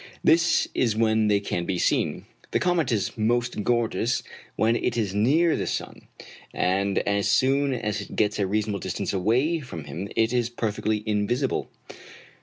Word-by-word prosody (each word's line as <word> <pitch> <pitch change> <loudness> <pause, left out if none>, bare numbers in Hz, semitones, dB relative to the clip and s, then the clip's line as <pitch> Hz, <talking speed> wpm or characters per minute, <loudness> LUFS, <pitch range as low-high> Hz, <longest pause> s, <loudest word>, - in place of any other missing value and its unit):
This 165 +1 +4
is 115 -4 +1
when 110 -1 +2
they 105 -1 +3
can 90 -3 -3
be 95 0 -1
seen. - - 0 0.2
The - - +1
comet 175 -6 +1
is 100 -5 -1
most 120 +1 0
gorgeous 120 0 0 0.3
when 115 +1 +2
it - - -1
is 105 -4 -1
near 150 +11 +3
the - - -2
sun, - - -5 0.5
and 100 +2 +1
as 100 -1 +1
soon 135 +6 +2
as 105 -3 -2
it 105 - -9
gets 105 -1 +1
a 100 - +1
reasonable 105 0 -1
distance 95 +2 -3
away 125 - +1
from 125 - -8
him 80 +8 -6
it 115 +1 +2
is 120 -1 +1
perfectly 110 -2 -2
invisible. 110 +5 -1
110 Hz, 165 wpm, -25 LUFS, 100-120 Hz, 0.5 s, This